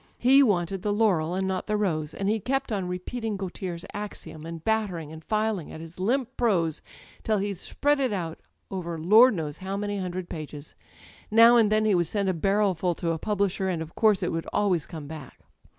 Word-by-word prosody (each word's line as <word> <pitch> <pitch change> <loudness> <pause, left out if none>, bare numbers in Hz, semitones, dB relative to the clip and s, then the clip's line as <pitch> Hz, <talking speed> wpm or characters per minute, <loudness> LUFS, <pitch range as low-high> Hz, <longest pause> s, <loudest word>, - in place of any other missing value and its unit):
He 265 +3 +6
wanted 195 -6 +1
the 205 - -1
hiuiel 180 -6 +2
and 190 0 0
not 190 -1 -2
the 210 0 +1
rose» 160 -7 -1
and 195 - -2
he 220 +2 +1
kept 270 +3 -1
on 195 -4 -1
repeating 210 +4 -4
Gautier's 180 -2 -5
axiom» 165 -6 -7
and 165 -1 -7
battering 195 -9 -1
and 160 0 -10
filing 215 -4 -1
at - - -8
his 165 +2 -10
limp 255 +6 0
prose 175 -10 +1 0.4
till 215 -1 +1
he'd 200 -2 -2
spread 290 +6 0
it 260 -4 +1
out 170 -5 -3 0.3
over 170 -3 -4
Lord 215 +9 +6
knows 150 -4 -4
how 190 +1 -4
many 205 0 -2
hundred 185 -1 -4
pages. 150 -3 -8 0.6
Now 230 +2 +7
and 220 -3 +4
then 215 0 +3
he 215 - +3
would 175 -3 +2
send 200 +1 0
a - - +1
barrelf 195 +1 +1
ul 175 -2 +2
to 170 0 -1
a 165 - -2
publisher, 200 -1 0
and 175 -3 -1
of 160 0 -7
course 215 -4 +3
it - - 0
would 165 0 -3
always 185 -7 +1
come 155 -3 -8
back. 145 -3 -10
190 Hz, 210 wpm, -26 LUFS, 165-215 Hz, 0.6 s, Now